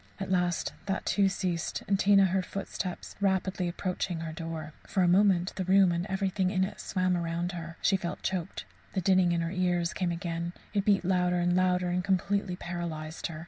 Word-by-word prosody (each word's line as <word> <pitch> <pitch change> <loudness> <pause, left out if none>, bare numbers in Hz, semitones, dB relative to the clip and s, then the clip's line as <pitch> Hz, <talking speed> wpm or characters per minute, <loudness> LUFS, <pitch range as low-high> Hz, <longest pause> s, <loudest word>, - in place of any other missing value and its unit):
At 195 -1 -4
last 180 -2 +1
that, 195 - -2
too, 200 -1 +3
ceased, 180 -3 -2
and 195 -1 +2
Tina 200 -1 +6
heard 185 0 0
footsteps 190 -2 -5
rapidly 190 -2 +1
approaching 180 -1 -2
her 165 -1 -4
door. 160 -2 -6
For 190 - +1
a - - +4
moment 185 -1 +4
the 190 - 0
room 190 0 +5
and 170 +2 -1
everything 190 -1 0
in 190 -1 +1
it 190 - -4
swam 185 -2 0
round 170 +1 -2
her. 170 -1 -7
She 195 - +4
felt 175 -2 -5
choked; 190 0 -3 0.3
the 190 - 0
dinning 185 -1 +4
in 170 -1 +1
her 165 0 -2
ears 180 -2 0
came 180 -2 -1
again, 170 0 -3 0.2
it 200 -1 0
beat 200 -3 +3
louder 180 -1 +2
and 175 0 +2
louder 180 -1 +2
and 180 +1 0
completely 195 0 0
paralysed 170 -3 -5
her. 155 -2 -7
180 Hz, 195 wpm, -29 LUFS, 175-190 Hz, 0.3 s, Tina